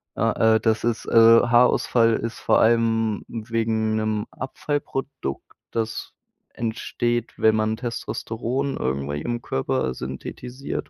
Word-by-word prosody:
Ah, 110 0 +3
äh, - - +3
das 110 -1 +1
ist, 120 0 -1
äh, - - -6
Haarausfall 115 0 +5
ist 115 0 -4
vor - - +3
allem 115 -2 +2
wegen 110 -1 -1
'nem 110 -1 -1
Abfallprodukt, 135 - -4 0.3
das 115 -1 -3 0.4
entsteht, 120 +1 -2
wenn 110 0 +4
man 110 0 0
Testosteron 120 +2 -3
irgendwie 70 +2 -2
im 120 +4 -3
Körper 65 -1 -1
synthetisiert 120 - -6
115 Hz, 115 wpm, -23 LUFS, 110-120 Hz, 0.4 s, Haarausfall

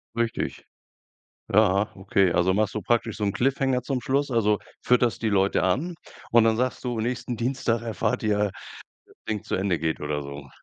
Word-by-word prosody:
Richtig. 115 -1 -2 0.9
Ja, 100 +2 +4
okay. 95 -1 +2
Also, 90 +2 +2
machst 105 0 +1
du 110 - -2
praktisch 115 -1 0
so 105 - -2
'n 100 - +1
Cliffhanger 130 +1 +1
zum 130 0 -2
Schluss. 140 +3 0
Also 105 -4 +2 0.2
fütterst 120 -4 +2
die 110 - +2
Leute 100 -1 +2
an 140 - 0 0.4
und 115 -1 +6
dann 110 -1 +3
sagst 125 +2 -1
du: 120 -3 -2
„Nächsten 120 +1 -2
Dienstag 120 -1 -1
erfahrt 115 -1 -1
ihr, 105 -2 +1 0.8
Ding 105 -2 -2
zu - - -4
Ende 95 -3 0
geht.“ 80 0 -2
Oder 75 0 -2
so. 70 0 -8
110 Hz, 175 wpm, -25 LUFS, 95-125 Hz, 0.9 s, und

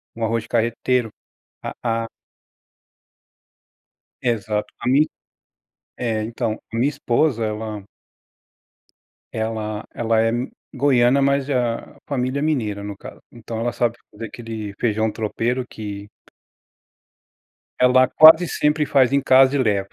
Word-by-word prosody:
arroz 115 0 -2
carreteiro, 115 +1 0 0.5
a - - -5 0.3
a - - -6 2.2
Exato, 105 -3 -1
a 120 - -5
min 140 +4 +4 0.9
é 110 -3 -1
então, 115 -1 -3
a - - -5
minha 130 +5 +2
esposa 130 -2 0
ela 105 -1 -5 1.5
ela 110 -1 -3
ela 115 -1 +1
é 115 0 +2 0.4
goiana 130 -1 +3
mas 140 0 +1
a 120 -3 -2
família 130 0 -1
mineira, 110 -10 -1
no 100 -1 -6
caso, - - -11
então 115 -1 -7
ela 120 +1 -1
sabe 120 -1 0
fazer 110 +2 -7
aquele 110 -3 -7
feijão 110 -1 0
tropeiro 120 +3 -2
que 100 -2 -7 1.7
Ela 130 0 +5
quase 160 +6 +7
sempre 150 0 +1
faz 135 -2 +3
em 140 0 +2
casa 130 +1 +5
e - - +1
leva. 100 -5 0
120 Hz, 115 wpm, -21 LUFS, 110-130 Hz, 2.2 s, quase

